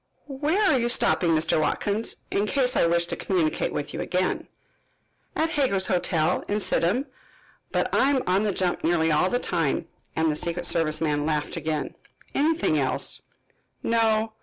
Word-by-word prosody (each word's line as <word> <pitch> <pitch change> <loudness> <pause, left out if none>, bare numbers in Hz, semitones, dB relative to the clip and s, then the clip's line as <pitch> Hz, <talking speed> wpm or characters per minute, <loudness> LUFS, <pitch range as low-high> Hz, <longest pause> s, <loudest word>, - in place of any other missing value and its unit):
"Where 295 +7 -1
are 325 -10 +4
you 240 0 0
stopping, 170 -7 +2
Mr. 155 0 +2
Watkins, 205 +7 -1 0.2
in 205 +1 0
case 255 +1 +1
I - - +4
wish 170 0 +2
to - - -4
communicate 170 -5 0
with 145 - -4
you - - -3
again?" 185 0 -1 0.9
"At 320 +1 +1
Hager's 255 -11 +1
Hotel, 175 -2 +1
in 205 +1 0
Sidham. 210 +6 +1 0.7
But - - -1
I 270 - +4
am 270 -3 +1
on 185 +2 +2
the 210 -1 +1
jump 180 -1 -1
nearly 160 -1 +2
all 155 +5 +3
the 245 - +1
time," 165 - -1 0.3
and 160 -1 +2
the - - -2
secret 170 +2 -1
service 160 -2 +1
man 150 -1 0
laughed 150 -2 -1
again. 155 -2 -3 0.4
"Anything 300 - +2
else?" 130 -2 -1 0.6
"No." 225 -1 +1
180 Hz, 165 wpm, -25 LUFS, 160-230 Hz, 0.9 s, are